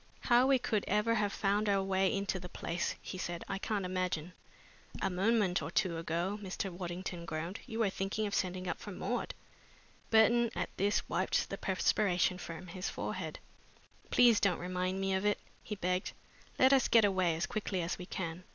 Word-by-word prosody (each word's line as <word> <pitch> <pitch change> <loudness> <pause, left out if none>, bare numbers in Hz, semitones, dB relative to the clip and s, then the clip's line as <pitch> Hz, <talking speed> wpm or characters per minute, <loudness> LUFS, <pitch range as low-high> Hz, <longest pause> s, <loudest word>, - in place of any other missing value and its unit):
"How 245 +1 +5
we 270 -1 +5
could 220 -4 0
ever 210 +3 +2
have 205 -3 +1
found 205 +1 +1
our 195 -1 +3
way 190 0 +2
into 195 -1 -1
the 180 0 -8
place," 170 +1 -2
he 185 - -6
said, 175 -1 -4
"I 195 - -3
can't 200 -2 -1
imagine." 180 -2 -2 0.7
"A 195 - 0
moment 195 0 +2
or - - -4
two 170 -5 0
ago," 170 +5 -2
Mr. 195 0 -3
Waddington 175 0 -5
groaned, 165 +4 -4
"you 225 - -5
were 220 -4 +2
thinking 195 +3 -2
of 200 - -3
sending 185 0 -1
up - - -2
for - - -8
Maud." - - -3 0.7
Burton, 230 +2 +5
at - - -3
this, 205 +2 +1
wiped 185 +2 0
the 195 - -3
perspiration 185 -1 +2
from 165 +1 -7
his 180 +2 -4
forehead. - - -4 0.7
"Please 240 -3 +6
don't 195 -4 +2
remind 185 +1 -2
me 195 0 0
of 190 +1 0
it," 210 0 +2 0.2
he 210 - -5
begged. 180 -1 -1 0.4
"Let 260 +1 +6
us 265 -2 +4
get 225 -2 +6
away 185 -4 +2
as 165 - -1
quickly 195 -4 -2
as 165 - -3
we 180 - -7
can." 170 -2 -4
190 Hz, 190 wpm, -33 LUFS, 180-210 Hz, 0.7 s, Please